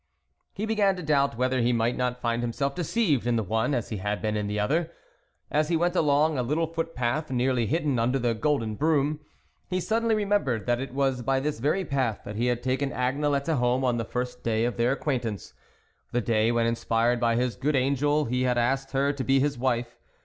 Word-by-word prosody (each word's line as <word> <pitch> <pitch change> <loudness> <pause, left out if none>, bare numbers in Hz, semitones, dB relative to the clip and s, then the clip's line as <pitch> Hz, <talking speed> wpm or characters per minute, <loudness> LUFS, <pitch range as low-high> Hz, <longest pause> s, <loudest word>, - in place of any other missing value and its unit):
He 205 - -2
began 210 -3 +2
to 180 - -7
doubt 140 -5 +1
whether 130 0 +1
he 120 +1 +2
might 115 0 +1
not 125 0 -2
find 120 0 0
himself 135 +4 -1
deceived 160 - 0
in 120 - +2
the 110 - +1
one 110 +7 0
as 120 - -3
he 110 - -3
had 105 +2 -2
been 110 -1 -1
in 105 -1 -1
the 105 +1 -2
other. 160 +10 0 0.6
As 150 +1 +1
he 170 - +2
went 175 +2 0
along 150 -2 +2
a - - +2
little 150 +7 0
footpath 155 -3 -2
nearly 125 -2 +1
hidden 150 -4 0
under 125 +4 +1
the 120 -2 0
golden 115 -2 0
broom, 150 +3 +1 0.5
he 185 - -1
sud 220 +5 0
denly 230 -1 +2
remembered 200 - 0
that 120 0 +1
it 135 -2 -5
was 135 -2 +1
by 135 +2 +1
this 145 -2 -2
very 150 +9 0
path 130 -8 -1
that 105 - -6
he 120 +3 0
had 120 -1 -1
taken 130 +2 0
Agnelette 140 +4 0
home 125 +1 +1
on 120 -2 +1
the 115 - -1
first 125 +2 -4
day 115 0 0
of 120 - -1
their 120 +2 +2
acquaint 135 -3 -2
ance; 105 -3 -5 0.6
the 120 - +1
day, 115 -1 +2
when 120 -1 +1
inspired 115 +1 +1
by 115 -1 +2
his 125 0 0
good 145 +3 0
angel, 140 +3 +2
he 125 +1 -1
had 125 -1 +1
asked 135 +3 0
her 140 +1 +2
to 140 -2 -4
be 135 +1 +3
his 145 +1 +1
wife. 120 -1 -2
130 Hz, 220 wpm, -26 LUFS, 120-150 Hz, 0.6 s, be